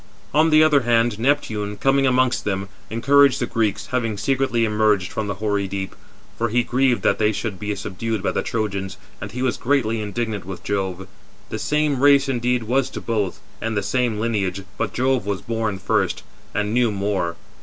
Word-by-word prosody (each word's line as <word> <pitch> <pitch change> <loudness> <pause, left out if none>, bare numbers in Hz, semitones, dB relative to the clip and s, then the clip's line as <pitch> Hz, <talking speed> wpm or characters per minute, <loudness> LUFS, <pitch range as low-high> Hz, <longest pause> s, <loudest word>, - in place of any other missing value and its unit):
On 155 +3 +4
the 155 0 +6
other 150 -2 +5
hand, 115 -2 +2
Neptune, 110 -6 0
coming 135 0 +3
amongst 130 -1 +2
them, 95 -1 -2 0.2
encouraged 140 +4 +4
the - - 0
Greeks, 105 -2 -1
having 115 -4 -1
secretly 130 -1 +1
emerged 105 -3 +2
from 110 -1 -3
the 100 - -2
hoary 100 0 -1
deep; 95 0 -4 0.5
for 115 0 +1
he 120 +2 +2
grieved 125 0 +1
that - - +2
they 105 0 +3
should 105 -2 -4
be 105 0 -2
subdued 110 +2 -3
by - - +1
the - - -1
Trojans, 100 -4 -3 0.2
and 100 +1 -6
he 125 +3 -3
was 130 -2 0
greatly 120 -5 +1
indignant 105 0 -3
with 95 0 -8
Jove. 95 -2 -2 0.4
The - - -4
same 150 -3 0
race 140 -1 +5
indeed 125 -2 0
was 125 +4 +1
to - - -6
both, 105 -5 -2 0.2
and 110 -1 -2
the 100 - 0
same 120 0 0
lineage, 100 -4 -1
but - - -2
Jove 130 -3 0
was 100 -4 -2
born 115 -3 -1
first, 100 0 0 0.3
422 - - 0
and 105 +1 -2
knew 120 -2 +3
more. 100 -4 -1
110 Hz, 190 wpm, -22 LUFS, 100-125 Hz, 0.5 s, the